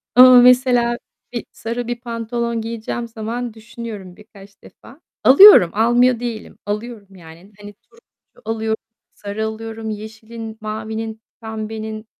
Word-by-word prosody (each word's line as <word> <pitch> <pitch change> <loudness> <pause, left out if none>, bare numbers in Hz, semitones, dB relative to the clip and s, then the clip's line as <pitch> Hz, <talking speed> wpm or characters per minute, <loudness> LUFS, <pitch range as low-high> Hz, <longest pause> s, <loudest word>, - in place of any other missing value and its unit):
Ama 255 0 +9
mesela, 245 -1 +4 0.4
bir, 235 - -4
sarı 235 +1 -5
bir 240 0 -4
pantolon 235 -1 -3
giyeceğim 230 +1 -5
zaman 230 +1 -5
düşünüyorum 220 -4 -9
birkaç 200 -1 -17
defa. 275 +7 -17 0.2
Alıyorum, 280 - +9
almıyor 240 +3 +3
değilim. 235 -3 -6
Alıyorum, 210 -1 -6
yani. 170 +2 -15
Hani 205 0 -11
turuncu 460 - -28
alıyorum, 220 0 -2 0.4
sarı 205 +2 -5
alıyorum, 220 0 -6
yeşilin, 220 +1 -8
mavinin, 220 +1 -5 0.2
pembenin, 220 0 -6
225 Hz, 120 wpm, -19 LUFS, 215-235 Hz, 0.4 s, Ama